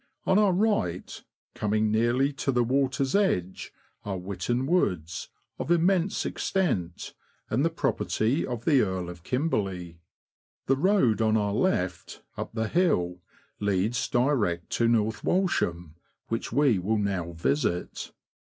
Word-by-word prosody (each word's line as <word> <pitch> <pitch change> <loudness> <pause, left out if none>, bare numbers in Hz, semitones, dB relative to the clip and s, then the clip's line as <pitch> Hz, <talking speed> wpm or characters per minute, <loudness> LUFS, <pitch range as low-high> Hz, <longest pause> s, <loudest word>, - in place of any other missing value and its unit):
On 190 - +4
our 205 -2 +4
right, 180 - -1 0.3
coming 105 0 0
nearly 120 +6 +2
to 135 0 -1
the 125 -1 +2
water's 135 +2 0
edge, 95 - 0 0.3
are 100 -2 -3
Witton 100 +7 -2
Woods, 90 - 0 0.3
of - - -4
immense 175 +2 +2
extent, 95 - -2 0.4
and 125 +6 +2
the 165 - +3
property 110 - 0
of 120 -3 -5
the 140 -5 +5
Earl 95 -3 -2
of 85 -1 -12
Kimberley. 95 - -2 0.7
The 135 - +3
road 140 - +3
on 110 0 +3
our 105 -1 0
left, 90 - -1
up - - -5
the 110 -1 0
hill, 90 - +1 0.4
leads 105 +5 0
direct 120 - +1
to 115 - +2
North 110 -2 +1
Walsham, 90 - 0 0.4
which 115 +1 -3
we 140 -9 +3
will 105 +5 0
now 95 -5 -2
visit. 80 +3 -1
110 Hz, 135 wpm, -27 LUFS, 90-140 Hz, 0.7 s, the